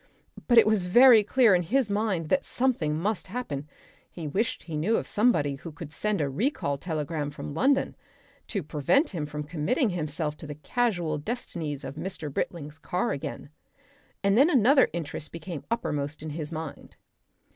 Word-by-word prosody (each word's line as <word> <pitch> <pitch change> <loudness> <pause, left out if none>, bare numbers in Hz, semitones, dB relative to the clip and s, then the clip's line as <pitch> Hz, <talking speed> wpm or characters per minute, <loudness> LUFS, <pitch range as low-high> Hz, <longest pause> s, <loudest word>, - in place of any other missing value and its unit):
But 240 - +4
it 230 - +9
was 215 -2 +3
very 225 +5 +7
clear 230 0 +4
in 180 - +4
his 225 +5 +1
mind 200 -6 0
that 275 - +2
something 205 -13 0
must 200 +5 -2
happen; 170 - -4 0.4
he 165 -3 -7
wished 205 +11 -1
he 165 - -6
knew 185 +10 +1
of - - -2
somebody 205 - +2
who 165 +4 -8
could 150 0 -9
send 210 +4 -1
a 145 - +1
recall 140 - -1
telegram 155 -2 -3
from 145 0 -7
London, 270 - +2 0.5
to 200 -6 -2
prevent 155 - +2
him 155 -6 -4
committing 150 - -1
himself 155 -2 -2
to 155 - -9
the 150 - -6
casual 175 - -1
destinies 155 - -4
of 145 - -7
Mr. 160 -4 -5
Britling's 150 -1 -4
car 180 +2 -1
again. 140 0 -5 0.7
And 200 0 +3
then 275 +8 +6
another 265 -1 +5
interest 160 -2 -5
became 165 -1 -7
uppermost 150 -10 -2
in 155 - -5
his 150 0 -5
mind. 160 -2 -7
170 Hz, 165 wpm, -27 LUFS, 150-220 Hz, 0.7 s, it